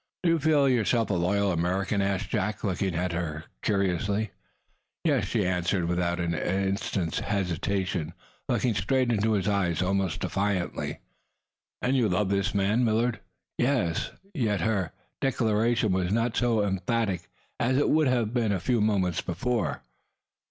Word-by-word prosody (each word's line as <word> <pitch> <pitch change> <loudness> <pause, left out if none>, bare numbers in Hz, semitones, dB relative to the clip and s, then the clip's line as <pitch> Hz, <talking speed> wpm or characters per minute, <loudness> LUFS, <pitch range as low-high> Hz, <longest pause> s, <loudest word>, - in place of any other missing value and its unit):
"Do 175 - +3
you 165 - +2
feel 150 -2 +3
yourself 120 -3 +2
a - - +2
loyal 95 +3 +1
American?" 95 +4 0
asked 100 -1 -1
Jack, 105 -1 -1
looking 95 -2 -1
at 90 +2 0
her 80 -2 -3 0.2
curiously. 100 +2 0 0.7
"Yes!" - - +2
she - - 0
answered, 90 0 0
without 85 0 0
an 85 -1 0
instant's 95 0 -1
hesitation, 95 -3 -1 0.3
looking 125 -3 +1
straight 120 +6 +1
into 110 0 +2
his 100 -2 0
eyes, 100 -5 +1
almost 95 -2 0
defiantly. 100 -3 -2 0.8
"And 130 +2 +2
you 120 -5 +3
love 95 +2 +1
this 100 +1 0
man, 100 +5 +2
Millard?" 115 +1 +1 0.4
"Yes!" 120 -11 +1 0.2
Yet 110 - 0
her 100 -4 0 0.3
declaration 115 -3 +1
was 90 -1 0
not 115 +2 +1
so 115 -3 +2
emphatic 95 -1 -1 0.3
as 130 +2 +2
it 145 - +2
would 155 -2 +4
have 120 -3 +1
been 115 -4 +1
a 100 - 0
few 120 +4 +1
moments 95 -5 +1
before. 115 +7 -2
100 Hz, 145 wpm, -27 LUFS, 90-115 Hz, 0.8 s, would